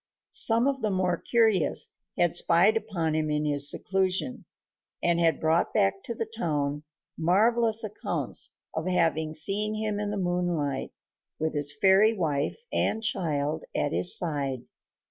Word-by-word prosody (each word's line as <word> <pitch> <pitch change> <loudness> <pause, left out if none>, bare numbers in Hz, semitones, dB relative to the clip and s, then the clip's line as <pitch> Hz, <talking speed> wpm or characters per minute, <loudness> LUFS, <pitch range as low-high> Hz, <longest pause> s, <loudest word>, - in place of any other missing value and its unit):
Some 230 +2 +4
of 275 -1 -1
the 215 - 0
more 185 -2 0
curious 220 -7 +1 0.3
had 175 -1 +1
spied 175 +5 +3
upon 170 -8 -2
him 155 -1 -1
in 150 0 -1
his 145 -1 +3
seclusion, 190 +6 -1 0.6
and 170 0 +2
had 165 -3 +2
brought 160 +2 0
back 195 -2 +1
to 235 - -5
the 225 - -3
town 150 -10 -3 0.4
marvelous 220 +6 +3
accounts 215 -1 -2 0.2
of 160 +2 -4
having 160 -3 0
seen 205 +7 +2
him 215 -1 -3
in 210 0 -3
the 205 - -3
moonlight 175 -7 -2 0.5
with 160 0 -2
his 145 0 -1
fairy 205 +3 +4
wife 150 -4 -1 0.2
and 220 - -1
child 155 -8 -1
at - - -1
his 90 +1 +4
side. 140 -6 -3
175 Hz, 145 wpm, -26 LUFS, 155-210 Hz, 0.6 s, Some